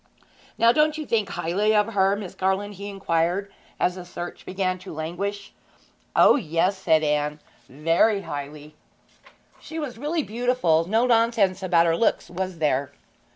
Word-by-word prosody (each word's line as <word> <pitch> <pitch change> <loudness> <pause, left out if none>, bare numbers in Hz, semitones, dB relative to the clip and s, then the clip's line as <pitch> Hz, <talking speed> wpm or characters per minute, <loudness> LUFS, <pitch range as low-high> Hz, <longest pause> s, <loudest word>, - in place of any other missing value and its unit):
'Now, 230 0 +5
didn't 305 +3 +2
you 310 - -5
think 215 -6 0
highly 195 +5 0
of 210 +2 +2
her, 195 0 +3
Miss 200 -3 -7
Garland?' 190 +2 -1
he 200 +1 -7
inquired, 190 0 -1 0.3
as 180 - +2
the 180 0 -8
search 175 0 -8
began 185 -1 -1
to 185 - -10
languish. 185 +6 -5 0.6
'O - - +6
yes,' 180 - 0
said 160 -4 +3
Anne, 150 0 0 0.3
'very 165 - +2
highly.' 145 +1 -7 0.9
'She 320 - -9
was 270 -7 -5
really 305 +3 -1
beautiful; 220 -9 +1
no 225 +4 +3
nonsense 230 -6 +2
about 175 -3 +3
her 165 -1 +2
looks, 225 - 0
was 185 0 -4
there?' 140 -3 0
190 Hz, 155 wpm, -24 LUFS, 165-215 Hz, 0.9 s, O